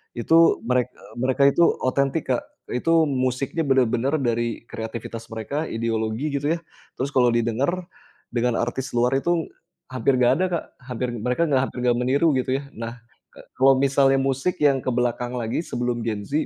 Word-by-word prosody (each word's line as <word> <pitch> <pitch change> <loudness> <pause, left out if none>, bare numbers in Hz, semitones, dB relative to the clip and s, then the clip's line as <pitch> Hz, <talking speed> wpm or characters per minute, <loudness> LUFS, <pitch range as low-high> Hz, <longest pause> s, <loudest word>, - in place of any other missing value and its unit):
itu 165 +4 +4
merek 125 +1 +1
e - - -18
mereka 130 +2 +1
itu 170 - +3 0.2
otentik 140 +2 0
Kak, 125 - 0 0.3
itu 165 +6 +3
musiknya 130 +4 -1
bener-bener 130 +1 +2
dari 120 -1 -1
kreativitas 115 0 -6
mereka, 140 +8 -3
ideologi 115 +4 -2
gitu 145 +3 0
ya, - - -7 0.4
terus 135 +2 -2
kalau 125 -3 +4
didengar 135 +11 -1 0.4
dengan 120 0 +1
artis 120 +2 -3
luar 125 +3 +3
itu 170 +3 0 0.4
hampir 130 +1 +1
nggak 120 - +5
ada 185 - +1
Kak, 170 - -1 0.3
hampir 125 0 -2
mereka 125 +9 0
nggak 130 -2 +3
hampir - - -13
nggak 120 -1 +3
meniru 140 +6 +3
gitu 130 +1 0
ya. - - -12
Nah, 115 0 -5 0.4
e - - -12 0.2
kalau 135 +1 +6
misalnya 135 0 +3
musik 135 +6 -1
yang 140 -2 +4
ke - - +1
belakang 120 0 -1
lagi 115 +1 -2
sebelum 120 -1 -2
Gen 105 -3 -2
Z, 150 +2 0
130 Hz, 170 wpm, -23 LUFS, 120-140 Hz, 0.4 s, kalau